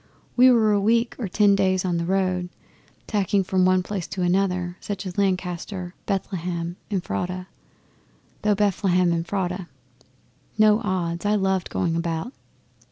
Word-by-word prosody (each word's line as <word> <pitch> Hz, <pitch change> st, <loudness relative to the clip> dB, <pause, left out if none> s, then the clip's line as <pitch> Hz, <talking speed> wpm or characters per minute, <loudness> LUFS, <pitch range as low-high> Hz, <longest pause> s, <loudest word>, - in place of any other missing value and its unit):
We 255 Hz, +1 st, +7 dB
were 225 Hz, -4 st, +4 dB
a 205 Hz, -1 st, +2 dB
week 230 Hz, +3 st, +2 dB
or 225 Hz, -, -2 dB
ten 205 Hz, +2 st, +4 dB
days 185 Hz, -1 st, +1 dB
on 175 Hz, -2 st, 0 dB
the 170 Hz, -, -1 dB
road, 185 Hz, -1 st, 0 dB, 0.6 s
tacking 200 Hz, -2 st, +1 dB
from 185 Hz, 0 st, +2 dB
one 185 Hz, 0 st, +3 dB
place 190 Hz, -3 st, -4 dB
to 185 Hz, -, -3 dB
another 180 Hz, -1 st, 0 dB
such 200 Hz, -1 st, -5 dB
as 180 Hz, -1 st, -5 dB
Lancaster, 180 Hz, -1 st, -2 dB
Bethlehem 175 Hz, -3 st, -3 dB
Ephrata 180 Hz, -, -3 dB, 1.0 s
"thou 210 Hz, -1 st, +2 dB
Bethlehem 185 Hz, -3 st, +2 dB
Ephrata." 180 Hz, +1 st, -2 dB, 0.9 s
No 215 Hz, 0 st, +5 dB
odds 175 Hz, -4 st, -2 dB
I 210 Hz, +1 st, +2 dB
loved 190 Hz, -2 st, 0 dB
the -, -, -16 dB
going 165 Hz, -2 st, 0 dB
about. 165 Hz, +7 st, -2 dB
185 Hz, 145 wpm, -24 LUFS, 175-205 Hz, 1.0 s, We